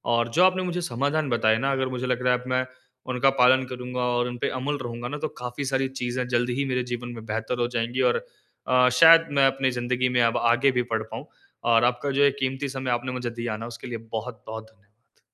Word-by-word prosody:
और 120 0 +1
जो 180 - +6
आपने 185 0 +2
मुझे 180 0 -2
समाधान 145 +1 -1
बताए 110 -2 +2
ना 140 - +2
अगर 130 0 0
मुझे 125 +1 -3
लग 125 -1 -1
रहा 125 - +4
है 125 - +1
अब 125 - -12
मैं 130 - +1 0.5
उनका 125 +2 +3
पालन 130 +1 +5
करूँगा 125 0 -5
और 120 0 +1
उन 125 0 -6
पे - - -1
अमल 145 +3 -2
रहूँगा 120 0 -5
ना, 145 - -5
तो 150 - -2
काफ़ी 125 +3 -4
सारी 135 0 0
चीज़ें 125 0 -2
जल्दी 120 +1 +1
ही 140 +3 -1
मेरे 125 0 0
जीवन 120 0 -5
में 115 - -9
बेहतर 115 +3 -3
हो 120 - +1
जाएँगी। 120 +3 -1
और - - -3 0.4
अ, 125 0 +4
शायद 165 +6 +7
मैं 140 -1 +4
अपनी 135 0 0
ज़िंदगी 125 +1 -1
में 120 - +4
अब 115 - +2
आगे 120 +3 +3
भी 125 - +4
पढ़ 110 - 0
पाऊँ। - - -6 0.5
और 115 - +4
आपका 125 +3 +1
जो 140 - +2
ये 140 - +5
कीमती 135 +1 -2
समय 130 -1 -3
आपने 120 +1 -1
मुझे 125 -1 -3
दिया 115 -2 -3
ना 115 - -6
उसके 120 +2 -9
लिए 120 -1 -4 0.2
बहुत-बहुत 110 -1 -7
धन्यवाद। 105 +2 -34
125 Hz, 240 wpm, -25 LUFS, 120-135 Hz, 0.5 s, शायद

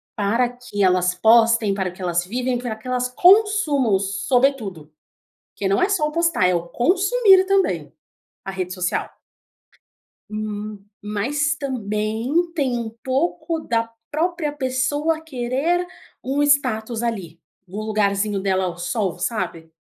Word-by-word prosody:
para 225 +4 +1
que 245 -4 -6
elas 180 -1 +3
postem, 225 +1 +4
para 190 -2 -2
que 185 +1 -14
elas 175 -1 0
vivem, 245 +5 -1
pra 240 -2 -4
que 220 - -13
elas 250 0 -1
consumam, 350 - +4
sobretudo, 200 - 0 0.6
porque 200 - -2
não 195 - +2
é 370 - +4
só 360 -7 +1
o 300 - -5
postar, 335 - +2
é 180 - +2
o 170 0 -3
consumir 385 - +4
também 390 0 0 0.5
a 195 - -4
rede 185 -1 -4
social. 180 -1 -2 1.2
Hum, 215 -1 -5 0.2
mas 275 +9 -1
também 240 +4 -1
tem 260 -6 0
um 230 -1 -4
pouco 320 +4 -1
da 230 -5 -1 0.2
própria 320 -1 -1
pessoa 290 +4 -1
querer 310 +5 -1 0.4
um 275 +3 0
status 240 -5 +1
ali, 190 -9 -4 0.3
um 195 - -7
lugarzinho 205 -1 0
dela 190 -1 0
ao 175 -1 -4
sol, 185 0 -2
sabe, 175 -5 -3
235 Hz, 135 wpm, -22 LUFS, 200-290 Hz, 1.2 s, postem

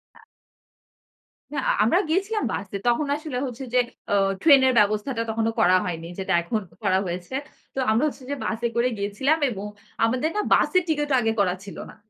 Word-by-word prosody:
আ। - - -19 1.3
না, - - -5
আ - - +5
আমরা 345 - +3
গিয়েছিলাম 395 +6 0
বাসে। 200 0 -5
তখন 240 +5 +2
আসলে 300 -4 -5
হচ্ছে 250 +1 -7
যে, 250 - +5 0.3
অ - - +2 0.3
ট্রেনের 270 -4 +6
ব্যবস্থাটা 215 +4 +1
তখনো 225 0 0
করা 180 +1 +5
হয়নি। 165 -2 -4
যেটা 190 0 -1
এখন 215 +6 -2 0.2
করা 185 - +3
হয়েছে। 175 +5 -5 0.4
তো - - -3
আমরা 225 +6 +2
হচ্ছে 280 -2 -7
যে, 285 - -1
বাসে 230 +2 -1
করে 235 +1 +2
গিয়েছিলাম 210 +10 +1
এবং 205 -3 -5 0.4
আমাদের 255 +7 0
না 420 - +1
বাসের 365 -1 +3
টিকেটও 295 -3 0
আগে 225 -1 +1
করা 185 -3 +3
ছিল 200 - -10
না। - - -13
235 Hz, 180 wpm, -24 LUFS, 200-285 Hz, 1.3 s, ট্রেনের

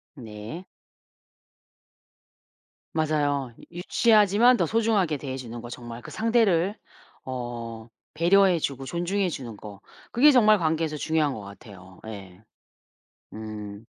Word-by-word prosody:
네. 115 - -8 2.3
맞아요. 145 -4 0
이 - - -15
유치하지만 215 +4 +4
더 - - +2
소중하게 215 -8 +1
대해 135 -1 -5
주는 120 -2 -7
거 120 - -9
정말 120 -1 -8
그 - - -10
상대를 215 -5 +2 0.5
어 120 -3 -6 0.3
배려해 180 +3 +4
주고 135 -3 -3
존중해 175 +5 -1
주는 125 -8 -7
거 100 -2 -10 0.3
그게 290 +5 +6
정말 215 -5 +6
관계에서 160 -2 -1
중요한 155 -2 0
것 110 - -7
같아요. 100 -2 -13
예. 95 -3 -10 0.9
음. 105 -1 -8
145 Hz, 235 characters per minute, -26 LUFS, 115-190 Hz, 2.3 s, 그게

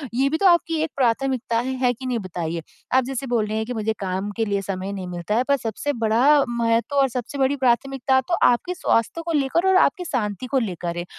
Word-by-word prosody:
ये 270 +2 +2
भी 315 - 0
तो 395 - -1
आपकी 340 -2 +3
एक 320 - -3
प्राथमिकता 250 -1 0
है। 260 +2 -2
है 250 -1 +4
कि 260 +3 -10
नहीं 245 -2 -1
बताइए? 170 -3 -4 0.3
आप 260 - +4
जैसे 270 0 -4
बोल 235 -3 +1
रहे 215 +1 -2
हैं 220 - -1
कि 245 - -4
मुझे 220 -1 -1
काम 190 +1 -3
के 225 - +1
लिए 200 -1 -1
समय 195 0 -4
नहीं 185 -2 -5
मिलता 175 +4 -3
है, 245 - +2
पर 280 - +4
सबसे 235 +5 -3
बड़ा 270 +6 +4
महत्व 235 +4 0
और 270 -1 +5
सबसे 250 +3 -5
बड़ी 270 +1 +2
प्राथमिकता, 265 +1 +2
तो 345 - -5
आपके 245 +9 +1
स्वास्थ्य 275 +1 0
को 335 - -2
लेकर 330 +7 +1
और 380 - +4
आपकी 360 +5 -2
शाँति 210 - -2
को - - +5
लेकर 175 -5 -4
है, 175 - -3
240 Hz, 235 wpm, -22 LUFS, 210-270 Hz, 0.3 s, और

